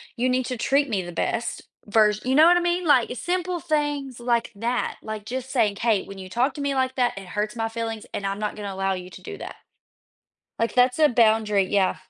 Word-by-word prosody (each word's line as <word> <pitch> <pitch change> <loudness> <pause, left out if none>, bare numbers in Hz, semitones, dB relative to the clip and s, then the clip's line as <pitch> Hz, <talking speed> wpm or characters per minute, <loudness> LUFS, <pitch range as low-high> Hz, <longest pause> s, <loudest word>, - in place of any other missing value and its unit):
you 255 +1 +1
need 255 0 +1
to 250 - -3
treat 280 +3 +2
me 200 -4 0
the 175 - -7
best 225 +7 -2 0.3
vers 215 -1 +3
you 260 +1 +1
know 310 +3 +8
what 350 +1 +6
I - - +1
mean, 350 +1 0
like, 260 -6 +4
simple 360 +3 -2
things 290 -5 -2
like 235 -1 0
that, 235 +4 -2
like, 215 -1 -6
just 260 +2 -5
saying, 215 -6 +1
“hey, 220 -2 +1
when 195 0 -10
you 185 -1 -8
talk 250 +8 +1
to 290 - -5
me 280 -1 -1
like 260 0 0
that, 245 -5 +1
it 195 - -7
hurts 210 +4 -3
my 225 -1 -1
feelings 225 -1 -4
and 200 - -3
I'm 195 +1 -2
not 210 -1 -2
gonna 205 -2 -5
allow 195 0 0
you 180 0 -6
to - - -12
do 415 -1 -8
that.” - - -7 1.0
Like, 230 -1 0
that's 250 +1 +4
a 305 -1 +6
boundary, 220 -4 +3
yeah. 190 0 +1
235 Hz, 235 wpm, -24 LUFS, 210-265 Hz, 1.0 s, know